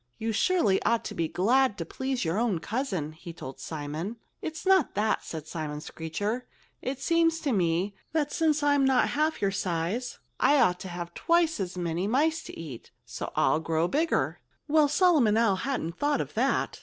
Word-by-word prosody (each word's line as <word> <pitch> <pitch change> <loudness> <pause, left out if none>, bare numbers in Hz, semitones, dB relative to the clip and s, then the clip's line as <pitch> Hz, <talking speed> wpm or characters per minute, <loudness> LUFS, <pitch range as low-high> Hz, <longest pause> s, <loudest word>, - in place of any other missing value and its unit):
"You 225 +1 -2
surely 225 - +2
ought 230 0 +1
to - - -4
be 165 - -1
glad 240 +7 +2
to 165 - -4
please 260 +4 -3
your 165 +6 0
own 230 -6 +1
cousin," 190 - -2
he 170 +2 -10
told 135 -5 -9
Simon. 155 +7 -5 0.3
"It's 320 +3 -5
not 380 -5 +4
that," 215 +2 +1
said 155 -2 -6
Simon 155 -2 -4
Screecher. 205 +11 -4 0.3
"It 260 +1 -3
seems 330 +3 +2
to 290 - 0
me 180 -1 +1 0.2
that 300 -2 0
since 305 -2 +1
I'm 285 -1 +4
not 265 -1 +3
half 305 -4 0
your 195 - +3
size, 185 +6 -2 0.2
I 290 0 +5
ought 180 -7 +3
to - - -7
have 175 -1 -6
twice 335 -3 +2
as 185 -1 -3
many 175 +2 -1
mice 310 +8 +2
to - - -9
eat, 145 -8 -8 0.2
so - - -6
I'll 155 - +3
grow 160 +1 0
bigger." 315 - 0 0.3
Well, 305 0 +4
Solomon 295 - +4
Owl 225 -5 +3
hadn't 185 -8 -3
thought 290 0 +1
of - - -4
that. - - 0
220 Hz, 185 wpm, -28 LUFS, -, 0.3 s, I